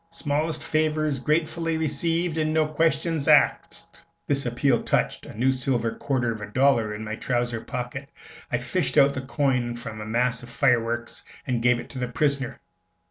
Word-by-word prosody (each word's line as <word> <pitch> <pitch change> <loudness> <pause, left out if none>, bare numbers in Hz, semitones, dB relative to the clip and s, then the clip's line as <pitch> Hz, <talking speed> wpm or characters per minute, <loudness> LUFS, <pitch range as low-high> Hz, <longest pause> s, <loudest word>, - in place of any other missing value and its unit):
Smallest 155 -1 -2
favors 155 -2 0
gratefully 160 +3 0
received, 165 +2 0
an' 155 0 +1
no 155 0 +3
questions 155 0 0
axed." - - +2 0.2
This 140 -2 0
appeal 120 +1 +2
touched - - -1
a - - -10
new 130 +3 +3
silver 125 -3 0
quarter 125 -3 -1
of 110 -1 -6
a 105 - -5
dollar 115 -2 +2
in 110 - -6
my 110 0 -4
trousers 120 -1 -2
pocket; 125 +3 -5 0.4
I - - +2
fished - - -1
out 140 0 +6
the 130 - -3
coin 130 -3 0
from 110 -2 -7
a - - -5
mass 120 +1 +1
of 120 - -11
fireworks, 120 -2 0 0.2
and 125 -3 -1
gave 120 0 +3
it - - -9
to 130 - -5
the 125 - -1
prisoner. 140 -1 -1
130 Hz, 175 wpm, -25 LUFS, 120-155 Hz, 0.4 s, out